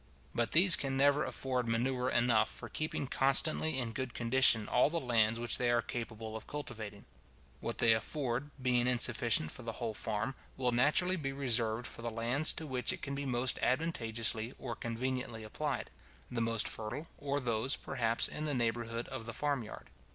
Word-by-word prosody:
But 120 -1 0
these 175 +2 +8
can 135 -1 -2
never 145 +2 +4
afford 125 -2 -2
manure 125 +2 0
enough 120 -3 +3
for - - -8
keeping 155 -2 -2
constantly 135 +3 +2
in 120 -3 -1
good 130 +1 -4
condition 115 -2 +3
all 125 - +3
the 170 +2 -1
lands 115 -4 +2
which 120 0 +3
they 125 - +2
are 120 0 +2
capable 110 -2 -5
of 110 - -7
cultivating. 110 -8 -7 0.5
What - - -3
they 115 - +5
afford, 130 +3 -2
being 125 -1 +2
insufficient 120 -8 +3
for - - -7
the 115 -1 -5
whole 115 -2 -3
farm, 110 +3 -2 0.2
will 125 -2 +1
naturally 150 +9 +3
be 135 -5 -3
reserved 120 -4 0
for - - -7
the 115 - -2
lands 120 +7 +2
to 160 - -6
which 130 -3 0
it - - -7
can 140 - -4
be 140 0 -3
most 125 0 +1
advantageously 115 -6 -1
or 120 -3 -5
conveniently 120 -1 -3
applied; 110 - -3 0.4
the 120 -2 -1
most 115 -1 +2
fertile, 120 +8 -5
or 145 0 -1
those, 120 +1 +1
perhaps, 115 -3 0
in 155 - -5
the 145 -2 -1
neighbourhood 115 0 -1
of 130 -4 -6
the 115 - -5
farm 145 +1 -1
yard. 110 - -10
120 Hz, 180 wpm, -33 LUFS, 115-135 Hz, 0.5 s, these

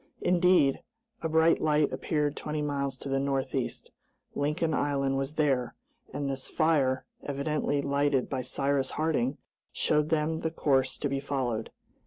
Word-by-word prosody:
Indeed, 180 -6 +4 0.4
a 160 - -1
bright 160 +1 +4
light 150 -1 +2
appeared 150 -2 -1
twenty 150 0 -3
miles 140 -2 -2
to 140 - -8
the 135 0 +1
northeast. 135 -1 -2 0.4
Lincoln 150 +3 0
Island 140 -2 0
was 135 +3 -2
there, 135 -6 +1 0.4
and 140 +1 -3
this 135 -1 -3
fire, 135 -5 +1 0.2
evidently 145 0 -1
lighted 140 -1 +1
by 130 -2 -2
Cyrus 135 +1 0
Harding, 150 -4 0 0.3
showed 150 0 +1
them 160 0 +1
the 160 - -1
course 135 -5 +1
to 145 - -1
be 140 0 -1
followed. 130 -5 -2
145 Hz, 145 wpm, -29 LUFS, 135-155 Hz, 0.4 s, Indeed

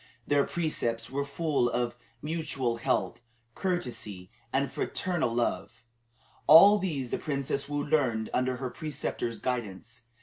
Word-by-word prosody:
Their 145 -1 +3
precepts 120 -9 -2
were 140 +1 -1
full 140 -3 0
of 120 0 -1 0.3
mutual 145 -7 -1
help, 115 - 0 0.3
courtesy, 120 - -3 0.2
and 135 +1 0
fraternal 175 -9 -1
love. 115 0 -2 0.6
All 200 +7 +9
these 145 -10 -3
the - - -1
Princess 140 -1 -2
Woo 145 0 -1
learned 125 -8 +1
under 130 0 +1
her 130 -1 -4
preceptor's 145 -6 -3
guidance. 115 -2 -4
135 Hz, 125 wpm, -29 LUFS, 120-155 Hz, 0.6 s, All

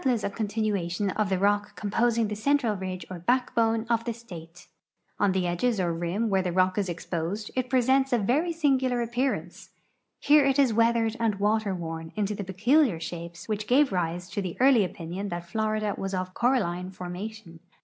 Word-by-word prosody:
ss 245 -6 +1
a - - -1
continuation 205 -3 -1
of 210 0 -1
the 190 - +1
rock 205 +2 +1
composing 230 +2 +1
tbe 210 - -4
central 240 0 +1
ridge 185 -2 -5
or 180 - -6
backbone 230 +1 +1
of 230 -1 +1
tbe 235 -1 -3
state. 175 -7 -12 0.5
On 205 -1 +3
tbe 185 0 0
edges 190 +6 0
or 175 -2 0
rim 175 +7 -1
where 195 -2 +2
tbe 180 -2 -3
rock 185 +2 +3
is 195 -3 -1
ex[)osed 175 +4 -4
it 255 -1 -1
i)resents 265 +1 +3
a 245 - +4
very 270 - +1
singular 260 -6 +1
appeai'ancc. 240 -8 -3 0.5
Here 295 0 +5
it 270 0 +2
is 270 -5 +4
weathered 230 0 +2
and 225 -3 +1
water 205 0 +1
worn 165 -1 -6
into 210 -1 -1
the 205 - -4
})cculiar 210 - +2
shapes 170 0 -7
which 215 -1 -3
gave 275 +3 +4
rise 175 -1 -2
to 205 - -2
the 185 -3 -5
early 255 -4 +5
opinion 180 +2 -5
that 175 -1 -5
Florida 215 +1 -1
was 195 0 -3
of 185 0 -3
coralino 190 -8 0
formation. 185 0 -7
210 Hz, 185 wpm, -27 LUFS, 180-235 Hz, 0.5 s, Here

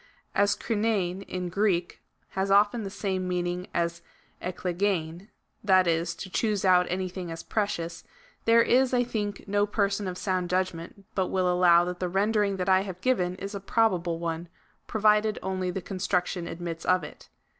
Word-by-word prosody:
As 200 0 +3
Kpiveiv, 205 -5 0
in 180 -1 -4
Greek, 180 -2 0 0.3
has 190 +1 -2
often 205 +4 +4
the 195 - -4
same 190 -2 -2
meaning 180 0 -2
as 170 0 -1 0.4
cKkejeLv, 180 -1 -2 0.4
that 185 -2 +5
is 170 0 0
to - - -7
choose 205 +1 0
out 180 -1 +5
anything 185 -1 -3
as 165 0 -6
precious,^ 170 -6 -2 0.4
there 230 0 +6
is, 255 +1 +3
I 245 - +3
think, 210 -4 -3
no 205 +1 +2
person 200 -1 0
of 180 -1 -4
sound 185 -2 -1
judgment 185 +1 -2
but 190 -2 0
will 185 -1 0
allow 175 -1 +5
that 180 0 -4
the 180 - -1
rendering 205 +1 +1
that 180 0 -2
I 190 0 +5
have 190 -2 -6
given 185 -7 +1
is 195 +2 -6
a 200 - -4
probable 185 -5 +1
one, 165 0 -3 0.4
provided 215 0 +3
only 185 -1 -2
the 185 +1 -3
construction 180 -2 -1
admits 165 -1 -5
of 185 0 +2
it. - - -11
185 Hz, 165 wpm, -27 LUFS, 175-205 Hz, 0.4 s, there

